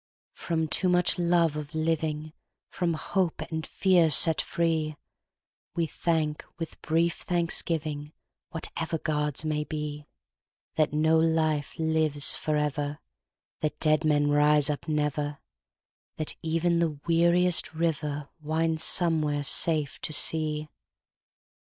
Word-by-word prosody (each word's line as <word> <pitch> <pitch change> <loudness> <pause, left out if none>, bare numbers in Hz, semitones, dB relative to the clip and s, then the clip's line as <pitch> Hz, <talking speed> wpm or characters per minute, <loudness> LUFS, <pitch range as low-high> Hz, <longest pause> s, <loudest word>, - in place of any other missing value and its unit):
From 160 -2 -2
too 185 +4 +2
much 180 0 +3
love 170 -3 +2
of 150 +1 -7
living, 155 -1 -2 0.4
From 170 -3 -1
hope 180 +1 -1
and 160 0 -4
fear 180 -4 +3
set 160 +2 +6
free, 160 -2 -1 0.8
We 170 - +1
thank 155 -2 -2
with 165 -1 -7
brief 165 +1 0
thanksgivingWhatever 160 -1 -3
gods 150 -2 -1
may 150 -1 -1
beThat 150 - -6
no 160 +2 +2
life 160 -3 0
lives 160 -3 +2
for 155 -1 -2
ever; 145 0 -2 0.6
That 150 -1 -3
dead 155 0 +2
men 145 -1 +2
rise 150 0 +5
up 145 - -6
never; 150 -1 -1 0.8
That 155 - -3
even 165 +1 0
the 160 -4 -1
weariest 170 +1 +3
riverWinds 160 0 -2
somewhere 155 -4 +2
safe 150 0 0
to - - -2
sea. 155 0 +1
155 Hz, 110 wpm, -27 LUFS, 150-165 Hz, 0.8 s, set